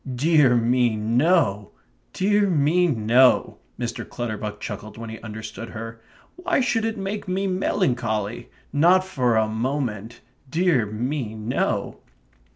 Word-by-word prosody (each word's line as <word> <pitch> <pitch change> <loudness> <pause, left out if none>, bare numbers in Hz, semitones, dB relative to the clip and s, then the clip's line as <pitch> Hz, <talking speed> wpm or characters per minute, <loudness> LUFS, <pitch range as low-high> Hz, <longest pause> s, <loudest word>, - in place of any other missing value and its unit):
"Dear 145 -2 +4
me 120 0 +2
no, 115 - +1 0.4
dear 205 +1 +2
me 170 +2 +3
no," 125 -1 +3 0.2
Mr. 120 -1 -3
Clutterbuck 110 -3 -5
chuckled 105 +2 -7
when 115 -1 -7
he 110 - -8
understood 110 +1 -8
her. 115 0 -8 0.4
"Why 360 -3 0
should 230 -4 +1
it 225 0 -2
make 195 +1 -4
me 190 +2 -1
melancholy? 120 - -1 0.2
Not 175 +6 +4
for 125 -10 +1
a 110 0 +2
moment 115 -1 -3 0.3
dear 160 - +2
me 115 +2 -3
no." 110 +2 -2
125 Hz, 125 wpm, -23 LUFS, 110-175 Hz, 0.4 s, Dear